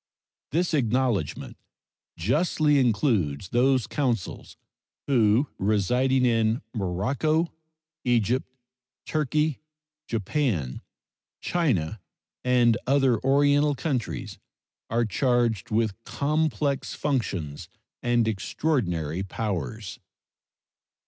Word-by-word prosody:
This 170 +4 0
acknowledgment 120 - 0 0.6
justly 150 - +2
includes 105 - +1
those 130 0 +3
consuls 125 - -2 0.5
who, 120 0 +3
residing 125 +6 +2
in 115 -1 +2
Morocco, 130 - 0 0.5
Egypt, 120 +1 +1 0.6
Turkey, 150 0 0 0.5
Japan, 110 - -1 0.6
China, 110 - 0 0.4
and 120 -3 +4
other 135 -3 +3
Oriental 145 +2 +3
countries, 130 -5 -3 0.5
are 115 +1 +1
charged 120 -1 +1
with 110 0 -1
complex 150 -1 -1
functions 100 - -2 0.3
and 120 -2 +2
extraordinary 95 - -1
powers. 100 -1 -4
120 Hz, 75 wpm, -26 LUFS, 105-140 Hz, 0.6 s, and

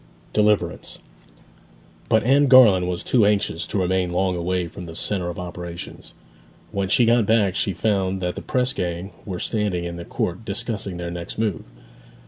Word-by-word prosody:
DELIVERANCE 105 -1 +1 1.1
But 110 - +3
Anne 140 +4 +4
Garland 110 -9 +7
was 90 -1 -3
too 120 -4 +3
anxious 100 -5 +1
to - - -3
remain 90 -1 +1
long 90 +1 +1
away 90 0 -1
from 90 +1 -9
the 80 - -9
centre 90 0 -2
of 85 - -6
operations. 85 -1 -8 0.6
When 100 -1 -2
she 120 +4 +4
got 115 -2 +3
back 105 -4 +3
she 100 - 0
found 95 -1 0
that 90 -1 -2
the - - -7
press 125 0 0
gang 90 +2 -3
were 90 -3 -5
standing 105 -6 -1
in 85 0 -5
the 85 - -7
court 90 +5 -3
discussing 100 -3 -3
their 85 0 -5
next 85 0 -6
move. 105 -7 -1
95 Hz, 170 wpm, -23 LUFS, 90-105 Hz, 1.1 s, Garland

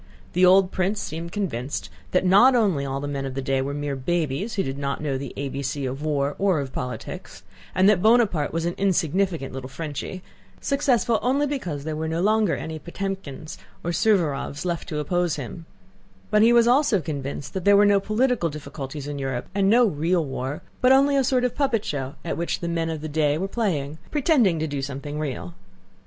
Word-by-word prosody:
The 180 - +2
old 185 +1 +6
prince 190 +3 0
seemed 165 +2 -5
convinced 150 - -3 0.2
not 195 +8 +5
only 190 - +2
that - - -4
all 135 +1 -2
the 145 - -4
men 140 -1 -3
of 135 -1 -5
the - - -2
day 135 -1 +1
were 135 +1 -2
mere 145 -1 -2
babies 170 - -1
who 195 - +1
did 135 +1 -4
not 140 -1 -2
know 145 -3 -2
the 130 -1 -5
A 140 - -2
B 135 +1 -4
C 140 0 -3
of 130 +2 -4
war 145 -2 0
or 190 -5 +2
of 135 -2 -5
politics, 125 - -6 0.3
and 185 +1 +5
that 205 -4 +4
Bonaparte 215 -9 +3
was 165 0 -2
an 175 - 0
insignificant 185 -5 0
little 130 0 -6
Frenchy, 160 +5 -6 0.4
successful 255 -5 +1
only 275 +4 +2
because 180 - -3
there 155 0 -3
were 160 +1 -3
no 160 +1 -1
longer 210 0 +2
any 160 -1 -5
Potëmkins 175 -4 -6 0.3
or 175 - -1
Suvórovs 165 -6 +1
left 170 -2 -3
to 155 - -3
oppose 175 +2 0
him; 160 +4 -7 0.6
but 210 - +4
he 230 +2 +6
was 235 -1 +5
also 250 -4 +4
convinced 145 -3 -5
that 190 - -3
there 200 +1 +6
were 205 - +6
no 200 -1 +5
political 215 -2 +1
difficulties 145 -1 -7
in 145 -1 -4
Europe 135 -3 -3
and 195 0 +2
no 240 +3 +6
real 170 -2 +1
war, 135 +1 -4 0.2
but 255 0 +5
only 275 +1 +5
a 275 - +3
sort 250 0 +2
of 250 - +1
puppet 265 -7 0
show 135 -2 -3
at - - -2
which 170 +1 -2
the 170 - -4
men 165 -1 -1
of 160 -2 -4
the 155 - -4
day 150 -1 +1
were 190 +4 -2
playing, 160 -9 -2
pretending 260 - +3
to 160 - -1
do 145 -3 -3
something 140 +2 -5
real. 120 - -4
165 Hz, 210 wpm, -24 LUFS, 140-200 Hz, 0.6 s, old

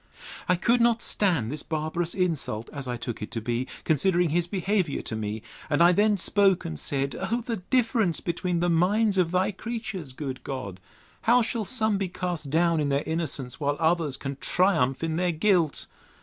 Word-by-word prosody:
I 180 - +5
could 235 +7 +2
not 235 -1 +3
stand 165 - +1
this 150 0 -4
barbarous 160 +2 -2
insult, 155 - -1
as 140 -3 -6
I 125 -1 -2
took 120 -2 -5
it 105 - -5
to 115 - -1
be, 120 +3 -2 0.2
considering 175 +2 +2
his 170 +2 +1
behaviour 190 -3 0
to 110 - -4
me; 110 0 -4 0.3
and 145 - +1
I 175 - +7
then 205 +3 +3
spoke 195 0 +3
and 80 -2 -4
said, 140 -1 -2
O 235 +2 0
the 230 -3 -2
difference 225 -2 +1
between 175 0 -1
the 175 - +2
minds 195 +4 +3
of 175 -2 +3
thy 185 +3 +1
creatures, 220 - -5
good 130 -2 -5
God! 125 -9 -5 0.5
How 245 0 +6
shall 225 -1 -2
some 220 -3 +1
be 195 -2 -1
cast 175 -5 -3
down 165 +2 +2
in 145 -1 0
their 140 +1 +1
innocence, 145 -6 -3
while 145 -1 0
others 160 -4 +1
can 135 -1 -5
triumph 160 -8 +1
in 160 -1 -1
their 180 0 +1
guilt! 170 -3 +2
170 Hz, 190 wpm, -26 LUFS, 140-195 Hz, 0.5 s, I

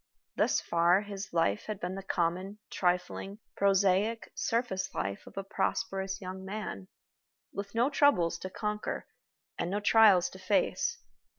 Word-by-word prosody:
Thus - - +2
far 170 +3 +3
his 200 -1 -7
life 135 -12 +1
had 215 -3 -4
been 180 +1 -3
the 195 - -5
common, 185 +2 -1
trifling, 180 +2 -1 0.2
prosaic, 200 +3 +2
surface 230 -5 -1
life 95 +2 -3
of - - -14
a 195 - -2
prosperous 195 -1 -2
young 185 0 -7
man, 190 - -5 0.7
with 200 +1 -6
no 235 +3 +4
troubles 175 - +3
to 185 - -5
conquer 210 +2 -3 0.5
and 170 - -1
no 200 +2 0
trials 205 -4 +6
to - - -11
face. 475 -1 +1
195 Hz, 140 wpm, -31 LUFS, 180-210 Hz, 0.7 s, trials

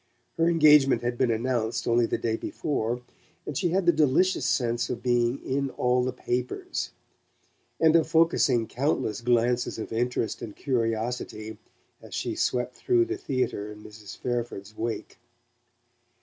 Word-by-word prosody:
Her 165 +1 +3
engagement 150 -6 +5
had 120 0 -1
been 125 0 +1
announced 115 0 -1
only 120 0 +3
the - - -1
day 110 -1 -1
before, 120 -1 -2 0.4
and 150 - -5
she 175 - +1
had 185 +2 +1
the 175 - +7
delicious 155 0 +2
sense 120 -3 0
of 120 - -4
being 120 0 +2
"in 135 +1 -1
all 125 0 +1
the 130 - -1
papers," 125 0 -3 0.9
and 160 0 +5
of 165 -2 +4
focussing 145 -8 +3
countless 125 -5 -1
glances 120 +1 +1
of 110 - -6
interest 120 -1 -1
and 105 - -7
curiosity 115 -3 -2 0.4
as - - -9
she - - -2
swept 125 0 -1
through 360 -1 +2
the 355 +1 -3
theatre 125 - -2
in 105 0 -12
Mrs. 105 -1 -11
Fairford's 120 -4 -4
wake. 115 +1 -4
125 Hz, 150 wpm, -27 LUFS, 115-140 Hz, 0.9 s, the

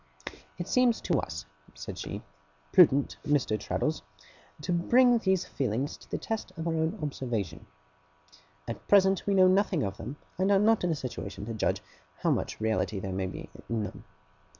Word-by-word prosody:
'It - - -4
seems 250 -3 +3
to 170 -7 +1
us,' 80 -1 -5 0.3
said - - -7
she, - - -6 0.5
'prudent, 145 -6 +5
Mr. 145 -7 +1
Traddles, 105 - -1 0.6
to 175 +4 -1
bring 240 +7 +5
these 190 -4 +1
feelings 130 +1 -2
to - - -18
the - - -2
test 220 -4 -4
of 165 +1 -3
our 165 - +1
own 160 0 0
observation. 115 - -3 1.0
At 115 - -6
present 195 -2 +4
we 200 - +3
know 185 -1 +7
nothing 185 -5 +3
of 100 0 -3
them, 135 - -6 0.2
and 190 +2 +3
are 200 - +6
not 215 +1 +4
in 180 - +2
a 165 - +1
situation 105 -7 -6
to 115 - -4
judge 110 - 0 0.4
how - - +3
much - - -1
reality 110 -2 0
there 95 0 -4
may 95 0 -1
be - - -7 0.2
in 115 -2 0
them. 100 - -7
150 Hz, 175 wpm, -29 LUFS, -, 1.0 s, know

